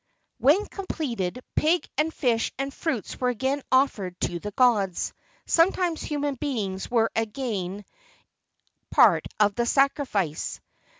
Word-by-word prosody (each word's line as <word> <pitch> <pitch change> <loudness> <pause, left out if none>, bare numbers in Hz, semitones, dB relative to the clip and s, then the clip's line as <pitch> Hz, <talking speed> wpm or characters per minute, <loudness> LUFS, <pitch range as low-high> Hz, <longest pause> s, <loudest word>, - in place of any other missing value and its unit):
When 295 - +4
completed, 250 - -4
pig 330 +3 +2
and 310 +2 +1
fish 240 -7 0
and 275 +1 -3
fruits 265 - -3
were 250 - +2
again 265 +4 -1
offered 215 -9 +1
to 175 0 -1
the 210 - -5
gods. 205 -5 +2 0.3
Sometimes 340 -1 +2
human 290 -1 -2
beings 220 -9 -3
were 230 -2 +2
again 210 -4 -3 1.1
a - - -9
part - - +6
of 205 -1 +4
the 235 +3 -1
sacrifice. 255 - 0
250 Hz, 125 wpm, -26 LUFS, 205-285 Hz, 1.1 s, part